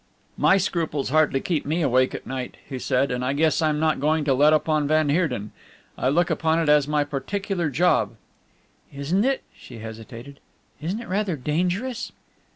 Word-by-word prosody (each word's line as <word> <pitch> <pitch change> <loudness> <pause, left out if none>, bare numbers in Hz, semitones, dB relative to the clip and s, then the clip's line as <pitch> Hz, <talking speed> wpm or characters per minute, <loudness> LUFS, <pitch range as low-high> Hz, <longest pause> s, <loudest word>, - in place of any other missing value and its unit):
"My 195 - +4
scruples 165 -7 -1
hardly 155 -2 +3
keep 165 -4 -1
me 160 +4 -1
awake 130 -1 +2
at - - -8
night," 130 -1 -5
he 130 -3 -5
said, 130 +2 +1
"and 125 0 -2
I 130 +2 0
guess 155 +2 +2
I'm 155 -1 +1
not 155 0 +1
going 155 +2 +1
to 140 -2 +2
let 145 +4 +5
up 155 +1 +2
on 155 -2 +1
van 155 0 +2
Heerden. 140 - 0 0.4
I 130 - 0
look 170 +5 +2
upon 160 0 +1
it 165 -2 0
as 150 -1 +4
my 150 -1 +1
particular 170 +5 -3
job." 170 +7 +2 0.8
"Isn't 145 +8 0
it" 270 0 0
she 120 - -12
hesitated 115 +5 -10 0.4
"isn't 185 +9 -3
it - - -10
rather 190 -1 -1
dangerous?" 180 - -2
150 Hz, 180 wpm, -24 LUFS, 135-170 Hz, 0.8 s, let